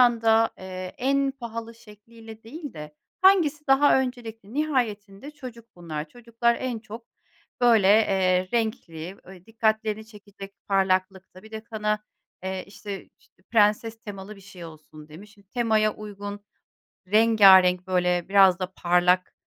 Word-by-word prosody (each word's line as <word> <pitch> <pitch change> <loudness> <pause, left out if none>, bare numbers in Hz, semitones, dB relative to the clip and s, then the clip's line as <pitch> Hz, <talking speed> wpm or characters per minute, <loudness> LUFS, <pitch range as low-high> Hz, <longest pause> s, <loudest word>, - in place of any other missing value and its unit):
anda, 225 -2 +4
eee, 185 -1 -8
en 275 +2 +1
pahalı 230 -3 -8
şekliyle 225 0 -15
değil 290 +6 -9
de 150 0 -10 0.3
hangisi 320 -6 +4
daha 270 0 +4
öncelikli? 230 -4 -7
Nihayetinde 245 -6 -2
çocuk 250 -6 -11
bunlar. 160 -3 -6
Çocuklar 235 +2 -1
en 255 -3 -3
çok 225 +1 -11 0.5
böyle, 225 -5 +4
eee, 190 -3 +3
renkli, 195 -7 -3
ööö, 185 -1 -14
dikkatlerini 220 -1 -1
çekecek 200 -2 -13
parlaklıkta, 190 -1 -1
bir 220 - -15
de 220 0 -6
kana, 215 -2 -2 0.5
eee, 190 -1 -4
işte 200 -1 -9
işte, - - -31
prenses 220 +1 +2
temalı 205 0 -9
bir - - -15
şey 185 -3 -12
olsun 155 -1 -13
demişiz. 200 +7 -14
Şimdi 200 -1 -24
temaya 220 -2 +1
uygun, 205 -1 -8 0.7
rengârenk, 190 -4 +5
böyle, 180 -1 0
biraz 195 -2 +5
da 185 0 -5
parlak, 180 +1 +2
210 Hz, 135 wpm, -25 LUFS, 190-230 Hz, 0.7 s, rengârenk